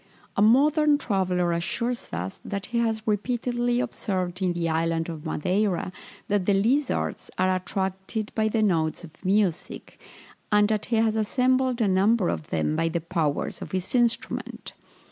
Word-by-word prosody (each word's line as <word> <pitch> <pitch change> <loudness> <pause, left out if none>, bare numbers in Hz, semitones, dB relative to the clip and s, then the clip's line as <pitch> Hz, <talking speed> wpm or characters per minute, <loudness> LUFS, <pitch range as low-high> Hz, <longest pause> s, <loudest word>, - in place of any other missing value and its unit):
A - - +1
modern 290 +6 +5
traveller 185 -7 0
assures 230 +8 -2
us, 90 +3 -5
that 200 -1 -4
he 235 - -1
has 225 -1 0
repeatedly 240 +3 0
observed 185 -6 -2
in 180 -2 +1
the 170 -1 -1
island 165 +1 0
of 160 -1 -6
Madeira, 185 +3 0 0.4
that 205 -3 0
the 200 - +4
lizards 255 +8 0
are 185 0 +2
attracted 190 +3 -3
by 220 -1 +1
the 220 0 +1
notes 165 -5 +1
of 170 - -10
music, 190 -3 -1 0.5
and 210 0 +5
that 215 -1 0
he 235 - -1
has 220 -1 +2
assembled 255 +3 +1
a 215 - +3
number 195 +1 +3
of 80 -2 -3
them 75 -1 0
by 165 - +1
the 170 +1 -1
powers 160 -3 -2
of - - -8
his 185 -1 -2
instrument. 240 -2 -1
200 Hz, 160 wpm, -26 LUFS, 175-230 Hz, 0.5 s, modern